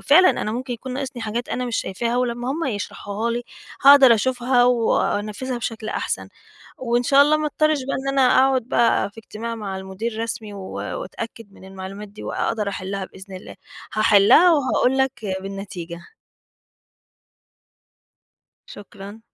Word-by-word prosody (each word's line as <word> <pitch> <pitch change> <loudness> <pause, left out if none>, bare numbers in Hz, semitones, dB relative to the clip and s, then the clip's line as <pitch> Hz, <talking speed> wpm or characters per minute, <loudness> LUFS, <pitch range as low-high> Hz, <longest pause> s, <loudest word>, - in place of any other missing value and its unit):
فعلًا 365 +6 +7
أنا 215 - -3
ممكن 250 +2 -4
يكون 250 +2 -6
ناقصني 260 -2 -5
حاجات 225 +2 -3
أنا 250 - -2
مش 240 -2 -2
شايفاها 230 +5 -2
ولما 245 0 -1
هم 325 +4 -2
يشرحوها 210 -1 -3
لي 240 +1 -2 0.4
هاقدر 275 -3 +9
أشوفها 245 +2 +2
وأنفذها 240 0 0
بشكل 225 -2 -5
أحسن، - - -3 0.5
وإن 240 -1 0
شاء 275 +3 +5
الله 300 +1 +4
ما 305 0 -1
اضطرش 310 +1 +1
بقى 275 - -2
إن 270 +1 -4
أنا - - +5 0.2
أقعد 265 -1 +3
بقى 230 -3 +1
في 225 - -19
اجتماع 225 +1 -6
مع 205 -4 -5
المدير 215 +4 -5
رسمي، 220 -2 -5
و 200 - -8
وأتأكد 230 - -6
من 195 - -16
المعلومات 195 +2 -8
دي 205 - -12
وأقدر 215 -3 -2
أحلها 195 0 -4
بإذن 190 +1 -12
الله، 185 - -11 0.4
هاحلها 210 -2 +4 0.2
وهقول 265 -3 +2
لك 265 -1 +2 0.3
بالنتيجة. 190 -3 -7 2.7
شكرًا. 205 +1 -11
230 Hz, 145 wpm, -22 LUFS, 205-260 Hz, 2.7 s, هاقدر